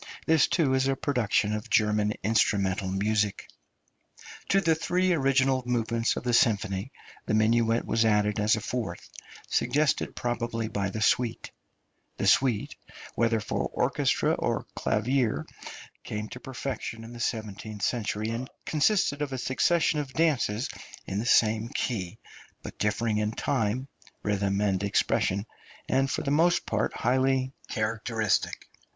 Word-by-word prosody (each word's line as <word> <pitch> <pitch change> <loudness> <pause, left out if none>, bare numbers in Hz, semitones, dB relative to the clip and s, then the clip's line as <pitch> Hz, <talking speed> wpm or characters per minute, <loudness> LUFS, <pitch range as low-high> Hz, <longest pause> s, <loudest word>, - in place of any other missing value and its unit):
This, 160 -2 +4
too, 160 -5 +2
is 130 0 +2
a 135 - +1
production 115 -6 0
of 105 +3 -4
German 105 -2 +2
instrumental 100 -3 +1
music. 100 +1 0 1.0
To 195 - +4
the 165 -4 +3
three 180 +3 +1
original 135 -3 +2
movements 115 -1 0
of - - -5
the 120 -1 0
symphony 105 -1 +2 0.4
the 110 - +1
minuet 115 +1 +2
was 115 - +2
added 105 -1 +2
as 105 +1 +3
a 110 - -4
fourth, 110 -7 -4 0.4
suggested 150 0 +1
probably 120 -2 -2
by 100 -2 -2
the 110 +3 -2
Suite. 120 0 +1 0.7
The - - -2
Suite, 125 -6 +2 0.4
whether 115 -1 +1
for 105 - -2
orchestra - - +1
or - - -1
clavier, 120 +2 0 0.6
came 105 0 -5
to 125 - -8
perfection 130 -3 -5
in 115 +1 -10
the 120 - -9
seventeenth 110 -3 -4
century, 110 -2 -1
and 120 +3 -4 0.2
consisted 155 -2 +2
of 145 -2 -2
a - - -2
succession 155 +5 +1
of 135 -3 -5
dances 140 -8 +1 0.4
in 95 - -3
the 115 - -3
same 110 0 +3
key, 95 -10 -3 0.5
but - - -9
differing 105 +1 0
in 105 +1 -1
time, 125 +1 -1 0.4
rhythm, 100 -1 0
and 100 -2 +1
expression, 100 0 +1 0.4
and 135 +1 +2
for - - -2
the 140 - -1
most 170 +4 +3
part 110 -1 0
highly 130 +1 +1 0.2
characteristic. 110 -1 -1
115 Hz, 140 wpm, -27 LUFS, 105-130 Hz, 1.0 s, This